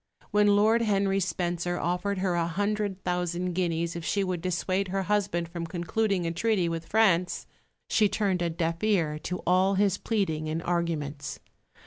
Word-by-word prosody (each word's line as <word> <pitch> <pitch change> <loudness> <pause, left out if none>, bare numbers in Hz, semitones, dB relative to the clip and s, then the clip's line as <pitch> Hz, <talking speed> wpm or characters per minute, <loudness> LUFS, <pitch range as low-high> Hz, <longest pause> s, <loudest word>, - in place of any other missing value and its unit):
When 205 -1 +4
Lord 220 +3 +4
Henry 195 -3 +2
Spencer 175 -1 -1
offered 180 +4 -1
her 185 -1 0
a 170 -1 +1
hundred 205 +2 -1
thousand 180 0 -1
guineas 170 -2 -1
if 170 - -5
she 195 +5 0
would 180 -3 -2
dissuade 185 +2 -1
her 195 +1 -1
husband 190 -4 0
from 170 -1 -5
concluding 180 +3 -1
a 165 - 0
treaty 195 0 +1
with 165 -1 -4
France, 190 -5 +2 0.4
she 215 -2 +3
turned 195 -4 0
a 170 - +1
deaf 165 +1 -2
ear 165 -8 +1
to 180 +3 -5
all 185 +2 +3
his 195 -1 +2
pleading 160 -8 -1
and 160 +2 -2
arguments. 155 -5 -2
180 Hz, 165 wpm, -28 LUFS, 170-200 Hz, 0.4 s, When